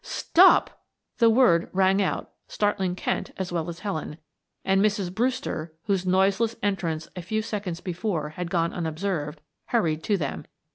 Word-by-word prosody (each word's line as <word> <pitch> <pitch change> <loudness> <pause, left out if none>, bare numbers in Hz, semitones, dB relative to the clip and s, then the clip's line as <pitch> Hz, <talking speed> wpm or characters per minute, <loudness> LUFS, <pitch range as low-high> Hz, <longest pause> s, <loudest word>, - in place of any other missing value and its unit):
"Stop!" 370 +3 +4 0.4
The 230 - +6
word 225 -8 +4
rang 190 +1 +3
out, 190 - -2 0.2
startling 195 -3 0
Kent - - -2
as 190 -2 -3
well 170 -1 -2
as 170 +1 -8
Helen, 160 -7 -4 0.5
and 195 0 +3
Mrs. 200 -4 0
Brewster, 230 - -2
whose 195 -3 -1
noiseless 195 +5 +2
entrance 175 -6 -1
a 180 - -5
few 220 +5 -2
seconds 200 -6 -4
before 175 -4 -2
had 170 +3 -5
gone 170 -1 0
unobserved, 160 -2 -3 0.3
hurried 165 -10 +1
to 205 - +2
them. 145 -6 -4
185 Hz, 150 wpm, -25 LUFS, 170-205 Hz, 0.5 s, The